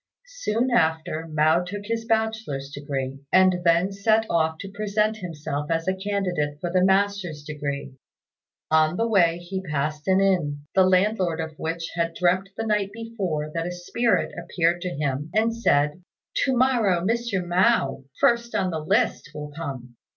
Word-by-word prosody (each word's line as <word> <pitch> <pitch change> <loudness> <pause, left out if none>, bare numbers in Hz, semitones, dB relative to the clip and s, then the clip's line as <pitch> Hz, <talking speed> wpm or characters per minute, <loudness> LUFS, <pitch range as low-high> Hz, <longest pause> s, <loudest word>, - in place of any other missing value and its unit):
Soon 260 - -1
after 160 -5 +1
Mao 155 +2 +3
took 200 +3 -6
his 225 +1 -2
bachelor's 220 -12 -1
degree, 135 -2 -4
and 185 -1 +5
then 170 +3 +3
set 215 +3 +2
off 160 -1 +1
to 195 +3 -8
present 210 +1 0
himself 150 -6 -5
as 165 +1 -1
a 190 - +2
candidate 190 -7 -2
for 175 +2 -3
the 185 -1 +4
master's 190 -5 +1
degree. 145 -2 -5 0.8
On 155 +2 +3
the 230 - +1
way 175 -6 +3
he 180 +2 -5
passed 150 -2 -3
by 190 - +4
an 190 - +4
inn, 170 -7 +1
the 190 -1 +5
landlord 185 -3 +2
of 160 -1 -4
which 165 +1 -3
had 165 -1 -1
dreamt 185 +2 +1
the 225 - -2
night 210 -2 0
before 200 -9 -4
that 165 0 -2
a - - -3
spirit 180 +7 0
appeared 175 0 0
to 180 - -2
him 145 -1 -2
and 225 +1 +2
said, 150 -7 +2 0.4
"To 265 -2 +1
morrow 235 -9 +3
Mr. 230 -4 0
Mao, 175 -7 +2 0.2
first 235 0 +2
on 185 - +1
the 160 - -2
list, 200 +4 0
will 150 0 -6
come. 130 -6 -7
180 Hz, 165 wpm, -24 LUFS, 155-205 Hz, 0.8 s, and